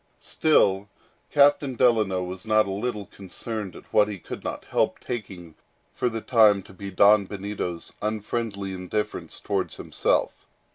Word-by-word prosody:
Still, 95 Hz, -, +2 dB, 0.4 s
Captain 140 Hz, -2 st, +4 dB
Delano 110 Hz, -7 st, +3 dB
was 90 Hz, +1 st, -6 dB
not 110 Hz, -1 st, +3 dB
a 100 Hz, -, -4 dB
little 105 Hz, +1 st, -3 dB
concerned 100 Hz, +1 st, -6 dB
at -, -, -14 dB
what 105 Hz, -1 st, +5 dB
he 105 Hz, -2 st, -5 dB
could -, -, -8 dB
not -, -, -5 dB
help -, -, 0 dB
taking 95 Hz, -8 st, -6 dB, 0.4 s
for 125 Hz, -, 0 dB
the 115 Hz, -1 st, -4 dB
time 105 Hz, -6 st, +4 dB
to 95 Hz, -, -15 dB
be 100 Hz, +1 st, -7 dB
Don 100 Hz, +2 st, +5 dB
Benito's 95 Hz, -4 st, -5 dB
unfriendly 105 Hz, -2 st, -3 dB
indifference 95 Hz, +3 st, -3 dB
towards -, -, -2 dB
himself. -, -, 0 dB
105 Hz, 145 wpm, -25 LUFS, 95-110 Hz, 0.4 s, what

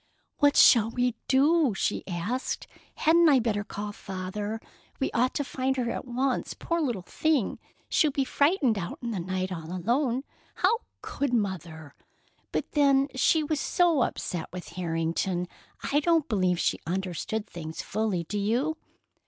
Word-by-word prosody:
"What 290 Hz, -1 st, +4 dB
shall 225 Hz, -3 st, +7 dB
we 245 Hz, +1 st, 0 dB
do?" 280 Hz, -, +4 dB
she -, -, -1 dB
asked. 195 Hz, +8 st, -3 dB, 0.3 s
"Hadn't 335 Hz, +1 st, +5 dB
I 280 Hz, -, +6 dB
better 220 Hz, -4 st, 0 dB
call 205 Hz, 0 st, -5 dB
Father? 205 Hz, +2 st, -5 dB, 0.4 s
We 270 Hz, -, 0 dB
ought 250 Hz, +3 st, +1 dB
to 285 Hz, -, 0 dB
find 265 Hz, -1 st, -1 dB
her 240 Hz, -2 st, 0 dB
at -, -, -4 dB
once, 255 Hz, +2 st, -1 dB
poor 335 Hz, 0 st, -1 dB
little 240 Hz, -, -1 dB
thing! 300 Hz, -, 0 dB, 0.3 s
She'll 305 Hz, -, +3 dB
be 275 Hz, -1 st, 0 dB
frightened 280 Hz, -, +2 dB
out 175 Hz, -1 st, -5 dB
in 235 Hz, -, -2 dB
the 205 Hz, -, -2 dB
night 185 Hz, +1 st, -2 dB
all 165 Hz, -2 st, -6 dB
alone. 240 Hz, -, 0 dB, 0.3 s
How 430 Hz, +5 st, +2 dB, 0.2 s
could 280 Hz, -3 st, -1 dB
Mother! 170 Hz, -8 st, -3 dB, 0.6 s
But -, -, -2 dB
then 275 Hz, -1 st, +4 dB
she 310 Hz, +4 st, +3 dB
was 300 Hz, 0 st, -1 dB
so 340 Hz, -4 st, +2 dB
upset 175 Hz, -7 st, -2 dB
with 180 Hz, 0 st, -7 dB
Harrington, 170 Hz, +1 st, -1 dB, 0.4 s
I 285 Hz, -, +2 dB
don't 325 Hz, -1 st, +2 dB
believe 185 Hz, -5 st, +1 dB
she -, -, +1 dB
understood 190 Hz, +4 st, -2 dB
things 160 Hz, -4 st, -7 dB
fully, 210 Hz, -5 st, -1 dB
do 205 Hz, +5 st, -3 dB
you?" 250 Hz, +10 st, 0 dB
230 Hz, 155 wpm, -27 LUFS, 185-280 Hz, 0.6 s, shall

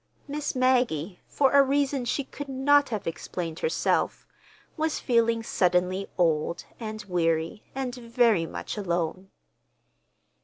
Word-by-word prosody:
Miss 290 Hz, 0 st, -3 dB
Maggie, 245 Hz, -, +1 dB
for 270 Hz, -2 st, +2 dB
a 280 Hz, -, +7 dB
reason 275 Hz, -1 st, +1 dB
she 275 Hz, +4 st, 0 dB
could 285 Hz, +1 st, -8 dB
not 280 Hz, +2 st, +3 dB
have 215 Hz, -4 st, -3 dB
explained 165 Hz, 0 st, -4 dB
herself, 475 Hz, -, 0 dB, 0.5 s
was 315 Hz, -1 st, -1 dB
feeling 230 Hz, -2 st, +2 dB
suddenly 185 Hz, -1 st, +1 dB
old, 165 Hz, -1 st, +1 dB
and 215 Hz, -2 st, -5 dB
weary, 165 Hz, +1 st, 0 dB
and 265 Hz, -2 st, -3 dB
very 235 Hz, -7 st, +2 dB
much -, -, -6 dB
alone. 175 Hz, 0 st, -2 dB
230 Hz, 120 wpm, -27 LUFS, 180-265 Hz, 0.5 s, a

